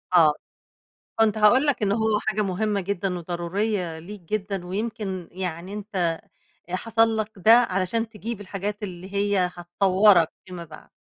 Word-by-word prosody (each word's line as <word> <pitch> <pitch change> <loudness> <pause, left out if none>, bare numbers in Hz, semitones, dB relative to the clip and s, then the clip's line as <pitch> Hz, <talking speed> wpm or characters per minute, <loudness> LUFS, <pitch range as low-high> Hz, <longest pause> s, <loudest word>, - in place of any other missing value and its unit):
آه. 160 -4 +6 0.9
كنت 220 -1 +3
هاقول 240 +7 +5
لك 280 -6 +1
إن 200 -1 +2
هو 220 0 +2
حاجة 215 0 +1
مهمة 205 +1 -1
جدًا 190 -1 -2
وضرورية 175 +1 -2
ليك 200 +5 -9
جدًا، 195 0 -3
ويمكن 195 -2 -4
يعني 180 0 -5
أنت 190 -6 -2 0.5
حصَل 225 +4 +2
لك 215 0 -2
ده 215 +4 +5
علشان 225 -1 +2
تجيب 225 0 -6
الحاجات 205 +1 -5
اللي 190 0 -7
هي 200 -3 +1
هتطوّرك 185 0 +4 0.2
فيما 180 -2 -7
بعد. 155 -1 -13
200 Hz, 140 wpm, -24 LUFS, 180-215 Hz, 0.9 s, آه